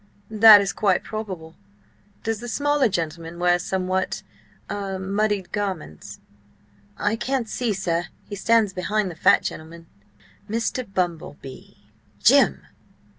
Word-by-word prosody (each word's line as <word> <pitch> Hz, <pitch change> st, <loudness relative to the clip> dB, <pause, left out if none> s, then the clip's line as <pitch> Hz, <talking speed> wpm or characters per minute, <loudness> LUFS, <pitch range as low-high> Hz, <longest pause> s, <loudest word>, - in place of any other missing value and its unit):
"That 215 Hz, -1 st, +9 dB
is 195 Hz, -, -2 dB
quite 195 Hz, -4 st, +1 dB
probable. 190 Hz, -7 st, -6 dB, 0.7 s
Does 225 Hz, -2 st, -2 dB
the 240 Hz, -, -7 dB
smaller 290 Hz, 0 st, +1 dB
gentleman 165 Hz, -1 st, -4 dB
wear 175 Hz, 0 st, +2 dB
somewhat–ah–muddied 190 Hz, +1 st, -3 dB
garments?" 190 Hz, -, -5 dB, 0.8 s
"I 210 Hz, +2 st, 0 dB
can't 245 Hz, +1 st, -2 dB
see, 235 Hz, +1 st, -2 dB
sir; 175 Hz, -3 st, -1 dB, 0.2 s
he 205 Hz, -, -6 dB
stands 220 Hz, -1 st, +2 dB
behind 195 Hz, +2 st, -1 dB
the -, -, -10 dB
fat -, -, +4 dB
gentleman." 165 Hz, +1 st, -7 dB, 0.6 s
"Mr. 230 Hz, 0 st, -2 dB
Bumble 175 Hz, -6 st, -2 dB
Bee.... 135 Hz, -1 st, -12 dB, 0.4 s
Jim!" -, -, +4 dB
195 Hz, 115 wpm, -23 LUFS, 175-220 Hz, 0.8 s, That